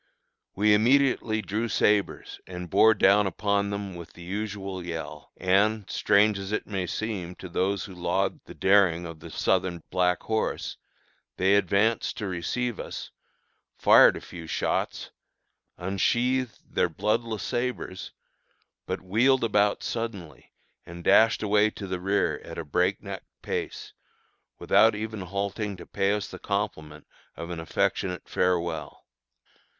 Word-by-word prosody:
We 105 +2 +4
immediately 115 -1 +3
drew 110 +4 -2
sabres 105 -2 0
and 90 -2 -7
bore 110 0 +6
down 100 +1 +4
upon 100 0 0
them 100 -1 -4
with 85 -2 -10
the 85 - -12
usual 95 -1 -4
yell; 80 -3 -7
and, 100 +2 +2
strange 100 0 +3
as 95 +1 -6
it 110 - -1
may 95 -3 -3
seem 95 -5 -4
to 95 - -9
those 95 +2 -1
who 95 - -10
laud 90 -1 -1
the - - -11
daring 95 -4 +3
of 85 -2 -8
the - - -10
Southern 90 -3 0
Black 90 -1 +1
Horse, 110 0 -2 0.6
they 95 +1 +3
advanced 100 +3 +2
to 110 - -3
receive 100 +7 -2
us, - - -6 0.7
fired - - +7
a - - -8
few 85 -2 -10
shots, - - -2 0.7
unsheathed 120 +7 0 0.2
their - - +2
bloodless 110 +5 -1
sabres, 120 -6 -3 0.8
but - - -3
wheeled 120 +8 +3
about 105 -2 +2
suddenly 115 -9 -5 0.3
and 85 0 -10
dashed 110 +4 +5
away 105 0 +3
to 105 - -8
the 90 -1 -3
rear 95 +3 0
at - - -9
a 85 - -4
breakneck 70 - -1 0.2
pace, - - -4 0.6
without 110 0 +4
even 110 0 -5
halting 100 +2 -3
to - - -10
pay 95 0 0
us 105 0 -1
the - - -10
compliment 80 -8 -3 0.3
of 85 +1 -7
an 85 - -4
affectionate 90 +2 -1
farewell. 85 -2 -1
100 Hz, 140 wpm, -27 LUFS, 90-110 Hz, 0.8 s, fired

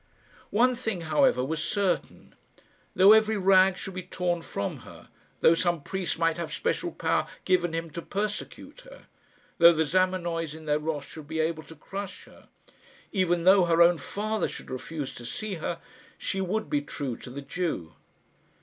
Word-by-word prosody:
One 245 +4 +3
thing, 225 -7 -3
however, 150 -5 +2
was 160 +3 -2
certain. 190 +2 -2 0.6
Though 190 +2 +7
every 220 0 +4
rag 190 -1 +5
should 190 - -6
be 185 - -4
torn 180 -1 -2
from 100 -10 -4
her - - -14 0.3
though 160 - +7
some 170 -2 0
priest 190 0 -3
might 165 0 +1
have 170 - -4
special 480 - -1
power - - 0 0.2
given 175 -3 +2
him 165 0 -3
to 170 - -5
persecute 210 - -5
her - - -15 0.5
though 170 0 +9
the 160 0 +1
Zamenoys 170 -2 0
in 160 0 -11
their 150 0 +1
wrath 150 -2 -3
should 155 -2 -10
be 160 - -3
able 160 0 0
to 160 - -13
crush 195 +5 -7
her - - -18 0.6
even 175 -4 +1
though 190 0 +6
her 170 -1 +2
own 170 -1 +4
father 215 +9 -2
should - - -9
refuse 140 +2 -5
to 120 - -10
see 210 - -4
her, 170 - -3 0.4
she 195 - -2
would 200 +2 -1
be 145 -1 0
true 140 -3 -5
to - - -10
the 140 +3 -7
Jew. 140 - -3
170 Hz, 175 wpm, -27 LUFS, 155-190 Hz, 0.6 s, though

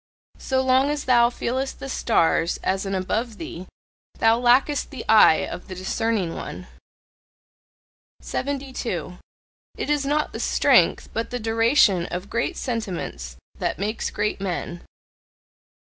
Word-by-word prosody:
So 260 -1 0
long 260 +2 +3
as 295 -1 -2
thou 240 -2 +5
feelest 260 +2 -3
the 275 - -6
stars 170 -9 +1
as 190 +1 -1
an 195 - -2
"above 215 +4 -2
thee," 180 +2 -8 0.5
thou 225 +1 +3
lackest 255 +4 +3
the 275 - -8
eye 215 -7 +6
of - - -8
the 185 - -7
discerning 190 -1 -1
one. - - -7 1.5
72. 255 - -4 0.6
It - - -2
is 295 -1 +1
not 295 +2 0
the - - -5
strength, - - +3
but 225 - -2
the 245 - -4
duration 225 -5 +3
of 180 +4 -6
great 235 - -1
sentiments 175 - -4 0.2
that - - -1
makes 210 +4 -2
great 210 -1 -2
men. 175 -2 -4
225 Hz, 130 wpm, -23 LUFS, 185-260 Hz, 1.5 s, eye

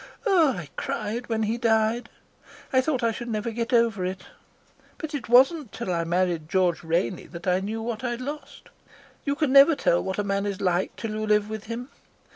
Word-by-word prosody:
Oh, 340 - +4
I 170 -4 -6
cried 220 +4 -3
when 220 -1 0
he 225 +3 -1
died. 225 +1 +1 0.6
I 260 - +5
thought 260 -3 -1
I 230 - +3
should 240 +2 -6
never 225 0 -2
get 230 0 -3
over 230 -5 +3
it. 185 +1 -4 0.7
But 315 -2 -6
it 270 -5 -5
wasn't 265 +1 +5
till 185 - -3
I 170 -1 -1
married 170 -2 0
George 180 -2 +1
Rainey 170 +2 -1
that 170 0 -10
I 180 0 +2
knew 220 +3 -4
what 230 0 -4
I'd 240 -1 -2
lost. 290 +4 -8 0.6
You 280 -1 0
can 295 -3 0
never 280 +3 +8
tell 175 -9 +2
what 190 0 -3
a 205 - 0
man 200 0 -1
is 200 -2 -3
like 180 -1 0
till 225 - -5
you 215 0 -3
live 210 0 +2
with 215 -1 -5
him. 235 +3 -6
220 Hz, 205 wpm, -25 LUFS, 190-245 Hz, 0.7 s, never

